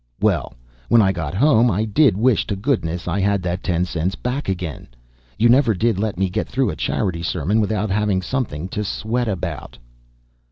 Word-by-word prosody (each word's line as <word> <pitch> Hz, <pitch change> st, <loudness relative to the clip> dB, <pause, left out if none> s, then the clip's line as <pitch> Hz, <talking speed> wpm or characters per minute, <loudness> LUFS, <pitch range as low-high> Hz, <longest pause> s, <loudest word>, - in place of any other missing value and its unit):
Well, -, -, 0 dB, 0.3 s
when 120 Hz, -, +6 dB
I 95 Hz, -3 st, +4 dB
got 85 Hz, -3 st, -4 dB
home, 125 Hz, 0 st, +4 dB
I 105 Hz, +1 st, 0 dB
did 110 Hz, 0 st, +3 dB
wish 120 Hz, 0 st, +2 dB
to 100 Hz, -, -2 dB
goodness 95 Hz, -, -2 dB
I 90 Hz, +3 st, -1 dB
had 100 Hz, -1 st, +1 dB
that 90 Hz, +1 st, -2 dB
ten 90 Hz, -1 st, 0 dB
cents 90 Hz, +2 st, -2 dB
back 125 Hz, +1 st, -3 dB
again! 90 Hz, -5 st, -4 dB, 0.5 s
You 115 Hz, -, +4 dB
never 120 Hz, -2 st, +4 dB
did 110 Hz, +1 st, +1 dB
let 105 Hz, -3 st, -2 dB
me 95 Hz, +1 st, +1 dB
get 90 Hz, -, -2 dB
through 130 Hz, -6 st, 0 dB
a -, -, -6 dB
charity 85 Hz, +1 st, -2 dB
sermon 90 Hz, +5 st, 0 dB
without 105 Hz, -1 st, -1 dB
having 100 Hz, -2 st, +1 dB
something 90 Hz, -, -3 dB
to 105 Hz, +1 st, -3 dB
sweat 115 Hz, +4 st, -2 dB
about." 85 Hz, -6 st, -4 dB
100 Hz, 190 wpm, -21 LUFS, 90-115 Hz, 0.5 s, when